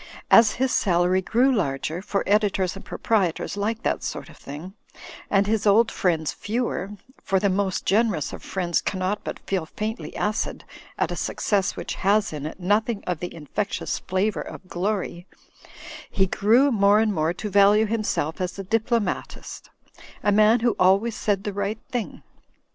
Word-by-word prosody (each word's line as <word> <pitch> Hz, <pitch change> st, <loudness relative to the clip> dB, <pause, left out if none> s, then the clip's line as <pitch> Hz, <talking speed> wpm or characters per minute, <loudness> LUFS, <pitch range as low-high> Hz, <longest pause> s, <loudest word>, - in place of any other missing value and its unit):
As 225 Hz, -2 st, +7 dB
his 260 Hz, +1 st, 0 dB
salary 180 Hz, 0 st, +2 dB
grew 250 Hz, +7 st, +2 dB
larger 160 Hz, -, -1 dB
(for 200 Hz, 0 st, -1 dB
editors 200 Hz, -3 st, +1 dB
and 195 Hz, -, -10 dB
proprietors 200 Hz, -8 st, -1 dB
like 215 Hz, +3 st, -2 dB
that -, -, 0 dB
sort -, -, -5 dB
of -, -, -15 dB
thing) 155 Hz, +7 st, -9 dB, 0.6 s
and 200 Hz, 0 st, +3 dB
his 215 Hz, 0 st, 0 dB
old 220 Hz, +3 st, +5 dB
friends 160 Hz, -5 st, 0 dB
fewer 210 Hz, -3 st, -3 dB, 0.3 s
(for 195 Hz, -, +1 dB
the 200 Hz, +1 st, +2 dB
most 190 Hz, -1 st, -1 dB
generous 205 Hz, -6 st, +1 dB
of -, -, -8 dB
friends 175 Hz, -3 st, -1 dB
cannot 190 Hz, +2 st, -2 dB
but -, -, -5 dB
feel 185 Hz, -5 st, -3 dB
faintly 220 Hz, +6 st, -5 dB
acid 210 Hz, +1 st, -2 dB, 0.3 s
at -, -, 0 dB
a -, -, -2 dB
success 200 Hz, -2 st, 0 dB
which -, -, -5 dB
has 200 Hz, -1 st, +2 dB
in 150 Hz, 0 st, -4 dB
it 160 Hz, -, -9 dB
nothing 210 Hz, +4 st, 0 dB
of 180 Hz, -3 st, -2 dB
the 175 Hz, -, -5 dB
infectious 170 Hz, +6 st, -3 dB
flavour 190 Hz, +3 st, -1 dB
of 185 Hz, -, -9 dB
glory) 185 Hz, -1 st, -3 dB, 0.8 s
he 190 Hz, -, +2 dB
grew 230 Hz, +9 st, +3 dB
more 205 Hz, -2 st, +4 dB
and 220 Hz, -1 st, +2 dB
more 155 Hz, -1 st, +1 dB
to 195 Hz, +4 st, -5 dB
value 205 Hz, +2 st, +5 dB
himself 210 Hz, -8 st, -2 dB
as 180 Hz, +1 st, -3 dB
a 195 Hz, -, -4 dB
diplomatist; 225 Hz, 0 st, -2 dB, 0.5 s
a 205 Hz, -, +3 dB
man 215 Hz, +3 st, +5 dB
who 235 Hz, 0 st, +2 dB
always 195 Hz, +5 st, +3 dB
said 200 Hz, -2 st, 0 dB
the 205 Hz, -, -3 dB
right 200 Hz, +2 st, -2 dB
thing. 245 Hz, -4 st, -4 dB
200 Hz, 165 wpm, -24 LUFS, 185-215 Hz, 0.8 s, As